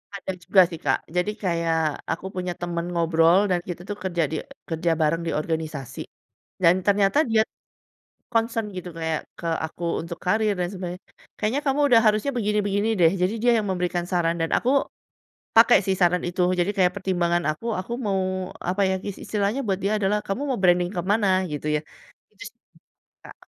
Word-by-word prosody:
Ada 195 -1 -4
juga 190 +3 +5
sih 165 -3 -7
Kak, - - +2 0.2
jadi 180 +4 +1
kayak, 170 -3 +1 0.3
aku 165 +3 -4
punya 180 -1 -2
teman 170 -1 -2
ngobrol 165 0 +4
dan 180 - +2
kita 175 -1 -5
tuh 205 - -3
kerja 175 -3 0
di - - -2 0.3
kerja 165 +1 0
bareng 160 +2 +2
di - - 0
organisasi, 155 -4 -4 0.6
dan 170 0 +7
ternyata 200 +6 +3
dia 220 -1 +5 0.9
concern 225 -1 0
gitu 180 0 -6
kayak, 160 -1 -1 0.2
ke - - -6 0.2
aku 160 - -13 0.2
untuk 170 0 -7
karir 215 +2 +2
dan 175 - 0
sebagainya, 180 -1 -6 0.4
"Kayaknya 220 +7 0
kamu 275 +1 +2
udah 235 -3 +6
harusnya 215 +5 +3
begini-begini 210 -1 0
deh." 165 -1 +6
Jadi 185 +4 +1
dia 240 0 +4
yang 215 - -1
memberikan 180 -1 -1
saran 170 -1 +1
dan 165 - 0
aku, 245 - +1 0.9
pakai 230 +2 +8
sih 190 - +2
saran 180 0 +3
itu, 180 +1 -1 0.2
jadi 175 +3 +2
kayak 180 -2 +3
pertimbangan 175 -3 0
aku, 155 +9 -6
aku 190 +5 -8
mau, 195 -1 +1 0.5
apa 195 +2 0
ya, - - +1
is 200 - -5
istilahnya 210 +4 -1
buat 190 -2 0
dia 200 +2 +1
adalah 205 +1 +1
"Kamu 195 +8 -2
mau 255 - 0
branding 175 -1 +3
ke 175 - 0
mana?" 210 0 +3 0.3
Gitu 150 0 -4
ya. - - -1 0.5
Itu 410 - -11
sih - - -47 0.7
Kak. - - -13
180 Hz, 180 wpm, -24 LUFS, 170-205 Hz, 0.9 s, pakai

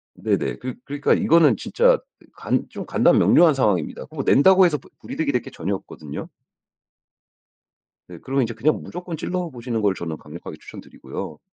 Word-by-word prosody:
네네. - - -1
그 125 -1 -5
그러니까 145 0 +1
이거는 165 -2 +4
진짜 - - +3 0.4
간 - - -1
좀 - - -7
간단명료한 170 -3 +5
상황입니다. 105 - 0
그거 - - -6
낸다고 190 +6 +6
해서 160 -4 +2
부 135 - -18
불이득이 155 -3 -2
될 125 -3 0
게 - - -10
전혀 95 +5 -3
없거든요. 75 -5 -8 1.8
네. 90 - -11
그러면 135 0 0
이제 115 0 -3
그냥 135 +8 0
무조건 175 -1 -7
찔러 180 +2 -3
보시는 120 -4 -4
걸 100 -2 +2
저는 80 -4 -5
강력하게 75 +3 -10
추천드리고요. - - -9
135 Hz, 380 characters per minute, -22 LUFS, 105-165 Hz, 1.8 s, 낸다고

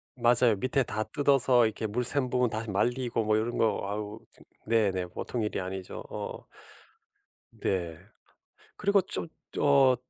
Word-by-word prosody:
맞아요. 120 -1 +4
밑에 130 +6 +1
다 110 -2 -2
뜯어서 135 -4 +3
이렇게 110 0 -2
물 120 +4 -1
샌 130 +1 +2
부분 125 -1 +1
다시 110 +1 -4
말리고 120 +3 0
뭐 110 0 +2
이런 115 +2 -1
거 110 - +2
아우 105 +1 -5
좀 - - -19 0.2
네네 100 -5 +1
보통 115 +6 -4
일이 105 -2 -2
아니죠. 95 0 -6
어. - - -6 1.1
네. 85 -4 -2 0.8
그리고 200 0 +3
좀 170 - -3 0.3
어 135 -3 +5
115 Hz, 260 characters per minute, -28 LUFS, 105-125 Hz, 1.1 s, 어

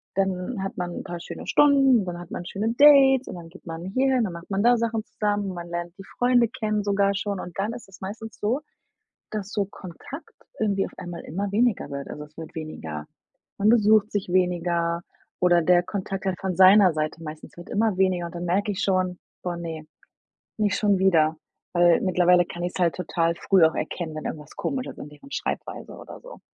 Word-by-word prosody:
dann 195 +2 -1
hat 195 - -5
man 180 -1 -3
'n - - -7
paar 175 0 -6
schöne - - -8
Stunden, 270 -7 +5
dann 175 -1 -5
hat 175 0 -11
man 175 - -5
schöne 215 +5 -2
Dates 270 -3 +7
und - - -6
dann 170 -2 -10
geht 190 - -16
man 165 +1 -6
hierhin, 260 +4 +2
dann 180 - -4
macht 170 +3 -10
man 195 +1 +1
da 240 0 +5
Sachen 225 -1 -1
zusammen, 205 -2 -1
man 175 -1 -7
lernt 175 +1 -5
die 195 - -9
Freunde 245 -1 +4
kennen 215 -3 -2
sogar 200 -1 +2
schon 200 -1 -2
und 175 - -9
dann 215 +4 -1
ist 235 -5 -10
es 190 - -15
meistens 220 +3 -7
so, 240 +8 0 0.7
dass 205 -2 -4
so 205 -2 0
Kontakt 200 - -10 0.3
irgendwie 200 -3 +1
auf - - -10
einmal 175 -1 -7
immer 195 +5 -4
weniger 230 +1 +1
wird, 140 0 -6
also 150 - -7
es 150 +1 -24
wird 160 -1 -8
weniger 80 - -6 0.5
man 205 - +2
besucht 215 -2 +5
sich 200 -3 -2
weniger 175 -2 +1 0.4
oder 175 -1 +5
der 175 +2 +4
Kontakt 195 0 -4
dann 190 -1 0
von 190 -2 -2
seiner 190 -1 +7
Seite 155 +1 -3
meistens 155 +2 -9
wird 175 - -11
immer 215 -2 +1
weniger 185 -2 +2
und 170 - -11
dann 175 +1 -4
merke 200 +4 +1
ich 195 - -4
schon: 185 -2 0 0.2
„Boah 175 -1 -3
ne, 165 -2 -6 0.7
nicht 210 -2 +1
schon 205 -2 +3
wieder“, 160 -5 +4 0.4
weil 175 -1 +5
mittlerweile 180 -1 +4
kann 175 0 -7
ich's 180 +1 -4
halt 170 -2 +2
total 170 -1 0
früh 190 0 +3
auch 160 - +1
erkennen, 160 -3 -4
wenn 155 - -5
irgendwas 150 -2 -6
komisch 260 -2 -3
ist - - -9
an 145 - -8
deren 210 - -15
Schreibweise - - -4
oder - - -11
so. - - -12
185 Hz, 210 wpm, -25 LUFS, 175-210 Hz, 0.7 s, Dates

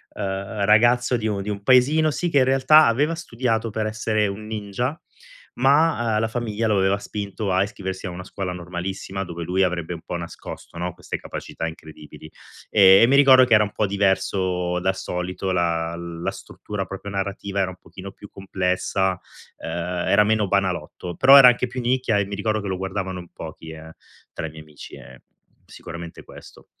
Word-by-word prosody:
ehm, 100 +2 -4
ragazzo 120 +4 +4
di 110 - -2
un 100 -2 -2
di 105 - -6
un 100 -1 -5
paesino, 145 +6 +4
sì, 175 +4 -2
che 145 - +1
in 130 - +4
realtà 135 +4 +5
aveva 145 +8 +1
studiato 115 -7 -2
per 110 +1 -2
essere 110 -1 0
un 100 +2 -6
ninja, 110 - -4 0.6
ma, 135 -3 +2
ehm, - - +2
la 110 - +1
famiglia 115 -1 -2
lo 105 - +2
aveva 95 +1 +2
spinto 100 0 -4
a 95 +1 +3
iscriversi 95 -1 -6
a - - -4
una 90 +1 -8
scuola 95 -1 -5
normalissima, 90 +2 -5
dove 85 -1 -6
lui 95 +3 0
avrebbe 90 -2 -2
un 80 - -8
po' - - -5
nascosto, 85 0 -9
no, 90 +1 -3
queste 90 - -6
capacità 80 - -6
incredibili. 80 -1 -11 0.4
Eh, 95 -2 +7
e 115 - +6
mi 135 - +3
ricordo 130 -2 +7
che 120 - +2
era 105 - +5
un 105 - -4
po' 105 - 0
diverso 95 -2 0
dal 95 +1 0
solito, 90 0 -4
la 85 -2 0
la 85 0 -5
struttura 105 -2 -7
proprio 95 +1 -8
narrativa, 100 0 -3
era 95 - 0
un 90 - -13
pochino 95 +4 -11
più 105 - -13
complessa, 95 0 -1 0.4
ehm, - - -7 0.4
era 105 - +5
meno 110 -1 +1
banalotto. 95 -2 -2
Però 135 +2 +7
era 125 -2 +10
anche 125 +1 0
più 125 +1 -5
nicchia 120 -3 +1
e 100 - 0
mi 100 +1 -6
ricordo 110 +1 -1
che 100 - -6
lo 95 - -2
guardavano 95 -1 -4
in 85 -1 -11
pochi, 80 0 -9
eh, 80 0 -11 0.4
tra - - -5
i - - -8
miei 80 0 -11
amici, 75 -1 -13
e - - -14 0.4
sicuramente 85 0 -10
questo. - - -15
100 Hz, 195 wpm, -22 LUFS, 90-110 Hz, 0.6 s, era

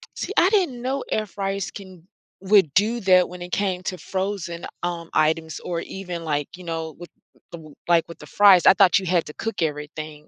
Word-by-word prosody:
See, - - -5
I 360 - +5
didn't 360 - +1
know 265 +2 -2
air 215 - 0
fryers 195 0 -4
can 185 -3 -12 0.3
would 190 -6 +4
do 225 +6 +2
that 185 -2 +5
when 180 0 -10
it 175 0 -8
came 185 -2 -1
to 185 - -4
frozen, 185 -3 -4 0.2
um, 170 -1 -4
items 160 +1 +1
or 170 -1 -4
even, 180 -3 -7
like, 145 -3 -1
you 180 - -12
know, 165 -2 -5
with 175 0 -11 0.4
the 160 -3 -11
like, 170 -1 +3
with 170 - -11
the - - -11
fries. 200 -3 +5
I - - +9
thought 185 0 +5
you 190 - -7
had 175 -2 +1
to 150 - -9
cook 225 -1 -5
everything, 150 0 -5
180 Hz, 205 wpm, -23 LUFS, 165-195 Hz, 0.4 s, I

